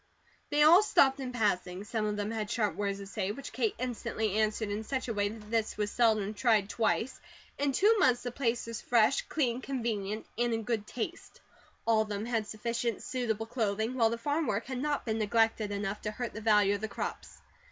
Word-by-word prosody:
They 295 0 +4
all 335 +5 +8
stopped 275 -10 +4
in 260 -2 -4
passing; 195 -5 0
some 215 0 -2
of 210 0 -2
them 205 +1 -2
had 215 -2 -3
sharp 210 -6 0
words 200 0 -1
to 200 - -8
say, 195 0 -3
which 275 +6 -8
Kate 230 -5 0
instantly 220 -4 -2
answered 215 0 0
in 210 +2 -3
such 260 +3 -3
a 230 - -1
way 205 -1 +1
that 215 0 -10
this 225 -2 0
was 210 -1 -1
seldom 215 -4 +2
tried 215 -3 +2
twice. 235 +2 0 0.4
In 285 0 +2
two 420 +10 +4
months 250 -8 +3
the 245 - -3
place 240 -2 -1
was 230 -1 -5
fresh, 235 +2 +3
clean, 255 -5 0
convenient, 220 -6 -3
and 240 -1 +2
in 225 - -3
good 215 -2 -2
taste. 290 +10 -6 0.5
All 225 -1 +4
of 215 - -3
them 205 +1 -3
had 225 -3 -1
sufficient 235 +1 -2
suitable 230 -4 -2
clothing, 220 -1 -1
while 230 -3 +3
the 230 - -2
farm 290 +6 -1
work 205 +3 -1
had 260 -1 -4
not 290 +1 -1
been 220 -1 -1
neglected 225 0 +2
enough 200 0 -3
to 210 - -2
hurt 235 +2 -4
the 215 - -6
value 210 -2 +4
of 205 - -3
the 220 - -2
crops. - - -5
225 Hz, 215 wpm, -31 LUFS, 210-245 Hz, 0.5 s, all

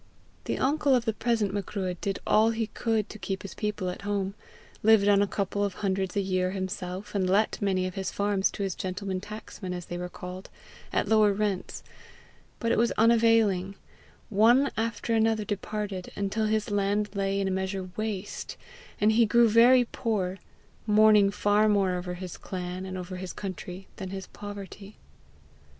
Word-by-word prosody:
The - - -1
uncle 280 0 +2
of 240 -2 0
the 225 - +1
present 220 -3 0
Macruadh 190 -3 -3
did 195 -1 -1
all 220 +1 +4
he 225 0 -1
could 220 0 -1
to 215 - -9
keep 195 -1 -4
his 195 - -7
people 210 -3 -3
at 180 - -4
home, 200 -1 -2 0.5
lived 215 -2 +5
on 200 -1 +5
a 205 - +2
couple 200 0 -1
of 200 -2 -2
hundreds 190 -1 -1
a - - +3
year 185 -1 0
himself, 190 +1 -5
and 190 -3 0
let 205 +3 +2
many 190 -2 +1
of 185 - -4
his 190 0 -3
farms 200 -1 +1
to 200 - -3
his 195 -2 -1
gentlemen 185 0 -4
tacksmen, 205 -3 -7
as 175 -1 -6
they 175 - -5
were 180 0 -4
called, 180 +1 -8 0.4
at - - 0
lower 215 -2 +5
rents; 200 -2 -2 0.8
but 230 -1 0
it - - +2
was 235 0 +3
unavailing; 225 -4 +3 0.5
one 235 +7 +4
after 230 +1 -2
another 220 -1 +2
departed, 205 -2 -4
until 205 +2 -1
his 215 -1 0
land 205 0 0
lay 195 0 0
in 195 - 0
a - - 0
measure 190 0 -3
waste, 215 -2 -4 0.4
and 210 +1 +4
he 225 +1 +4
grew 235 +2 +5
very 240 +3 +6
poor, 195 -5 -2 0.5
mourning 210 -1 +6
far 205 +1 +2
more 200 -3 +3
over 180 0 -4
his 180 -1 -7
clan 180 0 -5
and 185 0 -5
his 185 0 -6
country 190 -1 -7
than 190 - -5
his 190 0 -6
poverty. 205 0 -9
200 Hz, 175 wpm, -28 LUFS, 190-215 Hz, 0.8 s, very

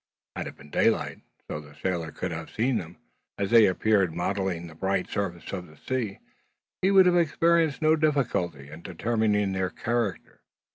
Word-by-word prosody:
Had - - -4
it - - -8
been 70 +2 -16
daylight, - - +1 0.3
so - - -4
that 75 -1 -12
the 75 - -17
sailor 85 -4 -2
could 90 - -4
have 80 -1 -6
seen 120 +3 0
them, 85 0 -9 0.4
as 100 +1 -2
they 115 -2 +8
appeared 95 -3 +2
mottling 95 -1 -1
the 80 - -10
bright 95 +3 -1
surface 95 -4 -4
of 90 -2 -4
the 75 0 -17
sea, 120 -7 -3 0.6
he 190 - +3
would 195 -1 +7
have 180 -1 +4
experienced 165 -2 +2
no 155 +1 +5
difficulty 120 - 0
in 80 +2 -10
determining 105 +2 0
their 95 -1 -1
character. 115 -2 -3
100 Hz, 180 wpm, -27 LUFS, 85-120 Hz, 0.6 s, they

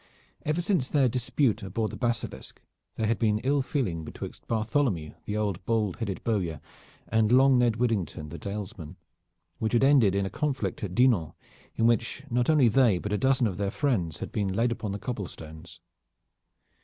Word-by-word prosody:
Ever 155 +3 0
since 175 -9 +1
their 140 -3 +3
dispute 120 -1 0
aboard 105 +3 -2
the - - -7
Basilisk, 120 -2 -3 0.4
there 110 - -1
had 115 +2 0
been 110 -2 +2
ill 140 +2 +2
feeling 110 - -2
betwixt - - -8
Bartholomew 110 - 0
the 105 - -2
old 100 -3 -2
bald 110 -4 0
headed 105 -5 -4
bowyer, 90 -9 -1 0.5
and 110 -1 +2
long 130 0 +6
Ned 120 -2 +3
Widdington 105 -10 -1
the 85 - -8
Dalesman, 95 -5 -6 0.6
which 110 +1 -1
had 120 - +4
ended 130 -9 +5
in 100 0 +1
a 95 - -4
conflict 145 -6 -2
at 95 -3 -4
Dinan, 115 -11 +3 0.4
in 115 - +1
which 115 +3 +1
not 120 +2 +1
only 150 -6 +5
they, 115 -4 +4
but 105 +3 -4
a - - +2
dozen 135 -1 +3
of 95 -5 -2
their 100 0 -1
friends 100 - -1
had - - -6
been 105 -3 -1
laid 115 +5 +1
upon 110 -3 -3
the 100 - -3
cobble 105 -4 -4
stones. 80 +2 -11
110 Hz, 180 wpm, -27 LUFS, 95-125 Hz, 0.6 s, long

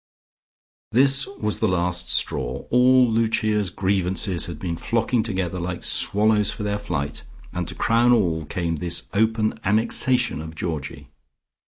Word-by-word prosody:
This 135 +2 +5
was 105 - -4
the 110 - +1
last 90 -1 -1
straw; 65 -4 -2
all 125 +1 +5
Lucia's 110 -3 0
grievances 95 -1 -1
had 85 -3 -7
been 85 +1 -4
flocking 115 +5 0
together 95 -5 -3
like 90 0 -5
swallows 105 0 +2
for 105 - -4
their 105 0 -2
flight, 75 -8 -4 0.3
and - - -3
to - - -7
crown 120 +2 +2
all 85 -9 +1
came 85 0 -3
this 85 +2 0
open 110 +1 0
annexation 115 - +1
of 80 0 -9
Georgie. 80 -4 -5
100 Hz, 140 wpm, -22 LUFS, 85-115 Hz, 0.3 s, This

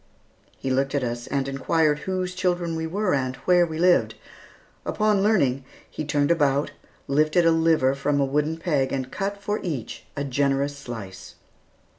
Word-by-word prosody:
He 130 - -3
looked 135 +2 0
at 140 - 0
us, 120 0 -4
and 135 -1 -1
inquired 150 +2 +1
whose 185 -1 -2
children 175 -2 -1
we 160 0 -2
were, 200 +3 0
and 130 -2 -1
where 175 -1 +4
we 160 -1 -5
lived. 175 +1 +3 0.7
Upon 210 -2 +1
learning, 140 - +2 0.2
he - - -6
turned 145 0 +1
about, 145 -3 +2 0.4
lifted 155 +4 +3
a 165 - +6
liver 160 -5 +3
from 145 +1 0
a 140 - +3
wooden 150 +4 0
peg 150 -6 0
and 130 -1 -3
cut 200 +1 -3
for 205 +1 -2
each, 145 - -5
a 140 - -1
generous 140 +1 0
slice. 110 -9 -9
150 Hz, 165 wpm, -24 LUFS, 135-175 Hz, 0.7 s, a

